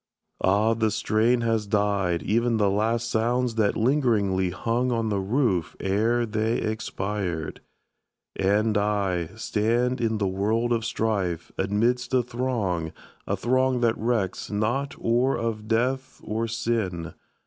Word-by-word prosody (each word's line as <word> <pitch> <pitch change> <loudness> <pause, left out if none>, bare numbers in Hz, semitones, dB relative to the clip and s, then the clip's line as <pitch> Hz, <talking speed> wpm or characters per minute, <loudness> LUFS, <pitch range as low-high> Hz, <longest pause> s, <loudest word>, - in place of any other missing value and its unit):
Ah, 105 +4 +3
the 110 -1 +1
strain 115 +3 +2
Has 115 -2 0
died 100 -5 +1
ev'n 115 +2 +2
the 100 -2 +2
last 115 +3 0
sounds 120 +2 +1
that 110 -2 +1
lingeringly 110 -8 +2
Hung 115 +7 -1
on 115 -2 0
the 100 -2 0
roof 95 - 0
ere 115 +5 +1
they 110 +1 0
expired! 100 -6 -3 0.7
And 105 +2 +2
I, 100 -5 0
Stand 120 +3 0
in 110 -1 +1
the 100 -2 0
world 110 +5 0
of 115 -1 -1
strife, 100 -8 -1
amidst 120 +5 0
a 125 - +3
throng, 115 -10 -2 0.3
A - - 0
throng 130 0 +1
that 115 -1 +3
recks 110 -5 -1
not 120 +7 -1
or 120 +4 +1
of 110 -2 -3
death, 130 +4 -1
or 110 +2 -2
sin! 110 -7 -2
110 Hz, 135 wpm, -25 LUFS, 100-120 Hz, 0.7 s, Ah